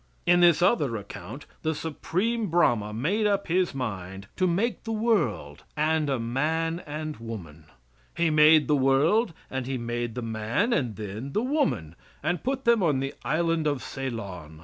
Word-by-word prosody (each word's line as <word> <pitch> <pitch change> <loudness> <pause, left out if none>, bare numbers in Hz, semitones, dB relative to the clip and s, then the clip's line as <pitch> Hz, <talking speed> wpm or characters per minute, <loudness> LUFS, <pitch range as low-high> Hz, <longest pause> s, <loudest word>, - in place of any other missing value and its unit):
In 175 0 +5
this 175 -1 +5
other 145 - +2
account 110 +6 -8 0.2
the 160 0 -1
Supreme 200 +9 -1
Brahma 120 - +2
made 185 - 0
up 200 -1 +1
his 180 -3 +1
mind 95 -6 -5
to 185 - +2
make 200 +8 0
the 225 - -4
world 130 - 0
and 155 0 +1
a 135 - +1
man 160 +8 -1
and 155 +1 -5
woman. 90 -10 -8 0.5
He 170 -1 +2
made 155 0 +6
the 150 - +3
world 145 - +3 0.2
and 130 -1 -3
he 135 -1 -2
made 120 -1 -3
the 125 - -4
man 115 - 0
and 120 - 0
then 110 +6 -6
the 215 - +1
woman, 255 - 0 0.3
and 175 - -1
put 265 +1 -2
them 235 -2 +4
on 150 -7 +2
the 135 +1 -3
Island 165 0 +1
of 145 -3 -1
Ceylon. 100 - -6
150 Hz, 170 wpm, -26 LUFS, 115-175 Hz, 0.5 s, made